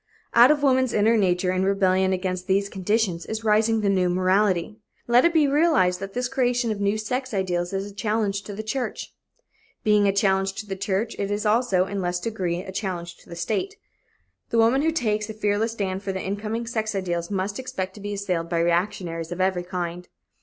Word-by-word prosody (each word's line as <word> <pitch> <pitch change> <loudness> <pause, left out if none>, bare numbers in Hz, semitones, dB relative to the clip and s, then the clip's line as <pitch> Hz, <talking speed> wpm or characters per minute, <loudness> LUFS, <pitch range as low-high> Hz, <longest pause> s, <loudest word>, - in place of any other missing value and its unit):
Out 240 +2 +8
of 295 -1 +2
woman's 260 -3 +3
inner 220 +2 +3
nature, 180 -3 +2
in 185 0 0
rebellion 190 -1 +2
against 185 0 -2
these 200 +1 +1
conditions, 195 -3 0
is 220 0 -4
rising 220 +1 +3
the 205 - 0
new 185 -2 +2
morality. 185 +2 +1 0.3
Let 240 +4 +4
it 340 - +5
be 315 -3 +4
realized 280 - +3
that 195 0 -6
this 250 0 0
creation 245 -2 0
of 205 -1 -4
new 200 +1 +1
sex 250 +2 -3
ideals 175 -2 -1
is 195 +1 -3
a - - -16
challenge 210 -1 -1
to 205 - -7
the 215 - -5
church. 245 +4 -4 0.7
Being 210 -1 +4
a - - +4
challenge 195 -1 +1
to 215 - -6
the 195 -2 -4
church, 200 +3 -2
it 200 - -1
is 205 +1 -2
also, 210 -4 +2
in 200 0 -4
less 175 0 -1
degree, 180 -4 -2
a 190 - -8
challenge 175 -3 -4
to - - -20
the 170 - -7
state. 215 - -2 0.7
The 235 - 0
woman 230 +4 +4
who 320 +2 +2
takes 215 -8 -1
a 220 - -6
fearless 215 +1 0
stand 195 -3 -3
for 200 -1 -3
the 190 - -4
incoming 215 +4 -3
sex 220 -2 -2
ideals 175 -3 -2
must 200 +1 -2
expect 195 -8 -4
to 205 - -12
be 205 0 -4
assailed 180 -4 -2
by 170 - 0
reactionaries 170 -1 -1
of 175 - -5
every 185 -1 +1
kind. 175 -1 -5
200 Hz, 210 wpm, -24 LUFS, 185-220 Hz, 0.7 s, Out